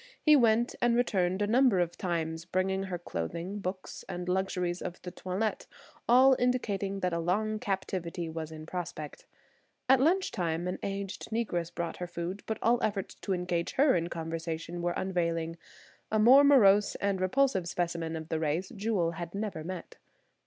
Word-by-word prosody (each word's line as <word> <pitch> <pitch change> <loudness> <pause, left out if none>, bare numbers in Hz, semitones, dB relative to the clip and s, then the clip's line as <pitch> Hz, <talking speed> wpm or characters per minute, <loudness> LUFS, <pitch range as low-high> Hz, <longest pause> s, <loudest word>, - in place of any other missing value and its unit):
He 305 -1 +6
went 235 -2 +3
and 240 -1 +3
returned 190 -5 +1
a - - +3
number 235 -2 +4
of 175 -1 0
times, 165 -3 -2
bringing 190 +2 -1
her 185 -2 -3
clothing, 170 - -4
books 185 -1 -5
and 180 0 -5
luxuries 180 -1 -1
of 180 0 -5
the 180 - -6
toilet, 190 +4 -3 0.4
all 260 +2 +7
indicating 205 -6 0
that 180 -1 0
a 170 - 0
long 215 +6 0
captivity 185 -4 -3
was 160 -1 -5
in 155 0 -8
prospect. 175 -3 -6 0.6
At 265 0 +6
lunch 355 +8 +2
time 170 -2 -2
an 180 - -3
aged 195 0 -4
Negress 210 -7 -1
brought 170 0 -4
her 180 - -4
food, 175 +3 -5
but 220 - -2
all 240 +1 +3
efforts 200 -3 -1
to 195 - -3
engage 175 -1 -1
her 275 0 +4
in 170 -1 0
conversation 165 +1 -4
were 175 0 -1
unavailing; 170 -3 -1 0.5
a 215 - +2
more 250 +6 +8
morose 210 -8 +5
and 200 -2 -1
repulsive 190 -2 +2
specimen 170 -2 -2
of 160 0 -6
the 160 - -1
race 160 +4 -1
Jewel 200 -5 0
had 170 +2 -7
never 200 -6 -3
met. 180 0 -7
185 Hz, 170 wpm, -30 LUFS, 170-215 Hz, 0.6 s, more